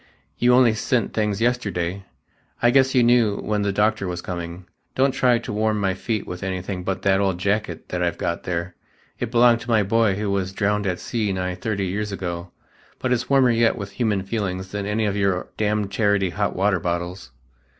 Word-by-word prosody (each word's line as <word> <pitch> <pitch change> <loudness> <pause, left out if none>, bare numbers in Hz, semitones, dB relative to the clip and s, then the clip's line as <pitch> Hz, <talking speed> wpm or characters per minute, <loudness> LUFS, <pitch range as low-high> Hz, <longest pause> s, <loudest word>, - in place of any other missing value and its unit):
You 125 +1 +5
only 125 -3 +5
sent 120 +2 0
things 105 -1 0
yesterday. 100 -6 -1 0.5
I 120 - +4
guess 130 0 +3
you 125 - +5
knew 120 -4 +4
when 105 -1 -1
the 100 -1 +1
doctor 105 -1 +1
was 90 -1 -3
coming. 85 0 -6 0.3
Don't 135 +1 +3
try 125 -2 +3
to 115 -2 -6
warm 110 0 +1
my 95 -2 +1
feet 110 +2 -3
with 90 - -7
anything 95 0 -4
but 95 +1 -3
that 95 -1 +3
old 95 -3 +1
jacket 100 -2 -2
that 90 - -2
I've 85 -1 0
got 85 -1 -2
there; 85 0 -3 0.5
it 120 - -2
belonged 120 0 +5
to 115 - -9
my 110 -3 +4
boy 110 0 +2
who 105 0 -2
was 95 -1 -1
drowned 105 0 0
at 90 -1 -1
sea 110 -4 -2
nigh 90 -1 -2
thirty 100 +2 -2
years 105 +3 -2
ago, 90 -2 -4 0.5
but 130 -1 0
it's 120 -1 -2
warmer 135 -3 +5
yet 115 0 +3
with 100 -3 -6
human 105 -3 0
feelings 95 -3 -3
than 100 -1 -3
any 110 +1 0
of 100 -1 0
your 100 -2 0
damned 105 -1 0
charity 100 -3 +1
hot 100 +1 -1
water 95 0 +2
bottles." 85 -2 -3
100 Hz, 200 wpm, -23 LUFS, 95-115 Hz, 0.5 s, You